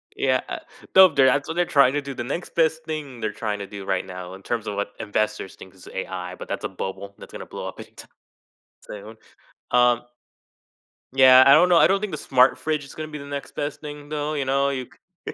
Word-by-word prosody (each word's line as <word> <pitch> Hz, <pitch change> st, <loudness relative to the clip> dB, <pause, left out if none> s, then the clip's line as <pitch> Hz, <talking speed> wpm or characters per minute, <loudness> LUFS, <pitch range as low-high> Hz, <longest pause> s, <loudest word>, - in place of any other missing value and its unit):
Yeah, -, -, +1 dB
uh -, -, -5 dB, 0.4 s
no, 190 Hz, 0 st, +9 dB
there 140 Hz, -4 st, +3 dB
that's 140 Hz, +2 st, +2 dB
what 160 Hz, -, -4 dB
they're 175 Hz, 0 st, +2 dB
trying 140 Hz, -5 st, +4 dB
to 145 Hz, -, 0 dB
do 140 Hz, 0 st, -7 dB
the 120 Hz, -, -5 dB
next 145 Hz, +8 st, -5 dB
best 160 Hz, -1 st, +1 dB
thing 150 Hz, -6 st, -6 dB
they're 110 Hz, -2 st, -3 dB
trying 105 Hz, -1 st, -3 dB
to 100 Hz, -, -6 dB
do 100 Hz, 0 st, -8 dB
right 95 Hz, -1 st, -1 dB
now, 90 Hz, -1 st, -8 dB
in 95 Hz, -, -11 dB
terms 115 Hz, 0 st, -3 dB
of 105 Hz, -, -3 dB
what 100 Hz, 0 st, -3 dB
investors 110 Hz, -2 st, -2 dB
think, 95 Hz, -, -14 dB
is 95 Hz, -, -14 dB
AI, 90 Hz, -1 st, -5 dB
but -, -, -10 dB
that's -, -, -4 dB
a -, -, -2 dB
bubble 100 Hz, +1 st, -6 dB
that's -, -, -13 dB
gonna -, -, -7 dB
blow -, -, -7 dB
up -, -, -9 dB
anytime -, -, -12 dB, 0.8 s
soon. 105 Hz, +2 st, -9 dB, 0.6 s
Um 120 Hz, -1 st, +4 dB, 1.1 s
Yeah, 130 Hz, -1 st, +8 dB
I 135 Hz, -, +9 dB
don't 180 Hz, -, +6 dB
know, 175 Hz, -, +5 dB
I -, -, +7 dB
don't 195 Hz, +1 st, +1 dB
think 210 Hz, -2 st, -3 dB
the -, -, -4 dB
smart 130 Hz, 0 st, +3 dB
fridge 155 Hz, -1 st, -2 dB
is 135 Hz, -, -13 dB
gonna 155 Hz, 0 st, -5 dB
be 150 Hz, -1 st, -7 dB
the 140 Hz, -, -9 dB
next 140 Hz, 0 st, -7 dB
best 145 Hz, 0 st, -4 dB
thing, 145 Hz, -1 st, -9 dB
though, 150 Hz, 0 st, -3 dB
you 145 Hz, -3 st, -2 dB
know? 140 Hz, +1 st, +1 dB
You 130 Hz, -2 st, -4 dB, 0.4 s
c -, -, -4 dB
130 Hz, 240 wpm, -23 LUFS, 105-150 Hz, 1.1 s, no